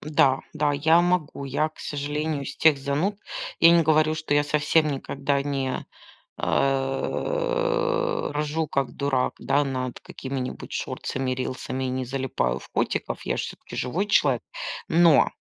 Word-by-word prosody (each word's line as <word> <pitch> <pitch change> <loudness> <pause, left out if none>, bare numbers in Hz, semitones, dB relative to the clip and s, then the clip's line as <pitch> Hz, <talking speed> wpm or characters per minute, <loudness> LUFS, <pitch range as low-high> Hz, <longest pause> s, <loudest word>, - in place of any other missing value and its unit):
Да, 140 -3 +3
да, 150 -1 +1
я 160 +4 +4
могу. 175 -5 0
Я, 140 +3 0
к 155 - -25
сожалению, 145 +1 -2
из - - -6
тех 155 -3 +5
зануд. 145 +9 -1 0.4
Я 165 - +9
не 170 -1 +6
говорю, 155 0 +3
что 155 -2 -1
я 145 - +4
совсем 150 +1 +2
никогда 140 0 -1
не, 135 -2 -2 0.5
э, - - 0
ржу, 150 +2 -1
как 140 -2 -1
дурак, 140 -3 0
да, 145 +1 +2
над 130 -2 -3
какими-нибудь 130 -1 -6
шортсами, 130 -1 -3
рилсами 130 +1 -3
и - - -1
не 130 0 -2
залипаю 130 - -1
в - - -14
котиков. - - -1
Я - - -1
ж - - -1
всё-таки - - -8
живой 170 +11 -1
человек, 135 - +3 0.5
но 165 -4 +5
145 Hz, 150 wpm, -25 LUFS, 135-160 Hz, 0.5 s, Я